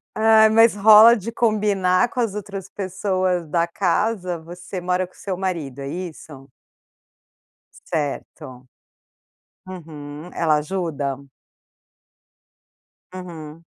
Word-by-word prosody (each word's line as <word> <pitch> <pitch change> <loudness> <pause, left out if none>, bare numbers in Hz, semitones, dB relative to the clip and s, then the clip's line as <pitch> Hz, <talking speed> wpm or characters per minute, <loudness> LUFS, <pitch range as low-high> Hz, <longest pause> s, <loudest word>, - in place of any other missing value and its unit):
Ah, 220 0 +5
mas 225 0 +5
rola 215 +3 +8
de 225 +1 -6
combinar 210 -3 +1
com 250 - -6
as 230 -5 0
outras 195 -2 -7
pessoas 185 -2 -2
da 170 +2 +1
casa? 180 0 -1
Você 175 +3 -8
mora 180 +1 -1
com 185 - -27
seu 190 -3 -5
marido, 165 -8 -4
é 135 - -5
isso? 155 -4 -8 1.4
Certo. 130 -4 -5 1.0
Uhum. 155 -3 -9
Ela 155 -3 +2
ajuda? 150 -4 -3 2.0
Uhum. 165 -3 -9
180 Hz, 100 wpm, -21 LUFS, 160-200 Hz, 2.0 s, rola